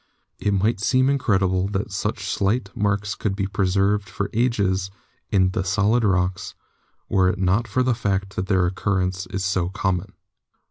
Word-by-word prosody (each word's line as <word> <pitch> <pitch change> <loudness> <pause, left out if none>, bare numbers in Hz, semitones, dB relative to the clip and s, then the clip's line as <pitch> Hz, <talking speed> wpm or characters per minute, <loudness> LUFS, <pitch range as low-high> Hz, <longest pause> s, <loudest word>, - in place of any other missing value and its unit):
It - - 0
might 100 +2 +1
seem 130 +5 +3
incredible 95 -8 +1
that 100 +1 -3
such 100 0 -3
slight 100 +1 -1
marks 100 0 0
could 100 -2 -2
be 100 -1 -1
preserved 100 +1 +1
for 100 0 -3
ages 100 -6 +1 0.4
in 95 -2 +3
the 95 0 -1
solid 105 +5 +2
rocks, 95 -3 0 0.5
were 95 -1 +3
it 95 - -1
not 95 +5 +1
for 130 +4 +1
the 125 -1 +2
fact 100 -3 -2
that 90 - -2
their 95 -3 +3
occurrence 95 0 -1
is 95 0 -3
so 95 -2 0
common. 95 -1 -2
100 Hz, 165 wpm, -23 LUFS, 95-105 Hz, 0.5 s, seem